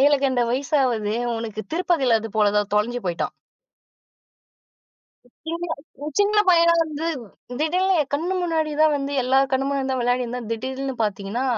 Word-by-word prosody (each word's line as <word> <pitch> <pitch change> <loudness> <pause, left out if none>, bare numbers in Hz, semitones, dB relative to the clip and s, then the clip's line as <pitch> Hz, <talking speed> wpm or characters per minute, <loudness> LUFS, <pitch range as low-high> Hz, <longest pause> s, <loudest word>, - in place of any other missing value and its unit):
ஏழுகழுத 275 -2 +3
வயசாவது 255 -5 0 0.2
உனக்கு, 220 -2 -5
திருப்பதில 290 -10 +2
இதுபோலதான் 210 -2 +1
தொலைஞ்சு 240 +3 0
போயிட்டான். 170 -1 -2 2.2
சின்ன, 335 +2 -3 0.5
சின்ன 410 +1 +3
பையனா 335 -1 +6
வந்து 310 0 -5 0.6
திடீர்னு 365 +4 +2
என் 275 - -11
கண்ணு 340 +6 -1
முன்னாடி 320 -3 0
தான் 310 -1 +5
வந்து, 280 0 -3
எல்லா 260 +2 +3
கண்ணு 265 0 +1
முன்னாடி 275 -1 -1
தான் 260 -1 -1
விளையாடிருந்தான். 245 -1 -1
திடீல்னு 265 +3 -4
பார்த்தீங்கன்னா, 210 +3 -2
265 Hz, 125 wpm, -23 LUFS, 230-315 Hz, 2.2 s, பையனா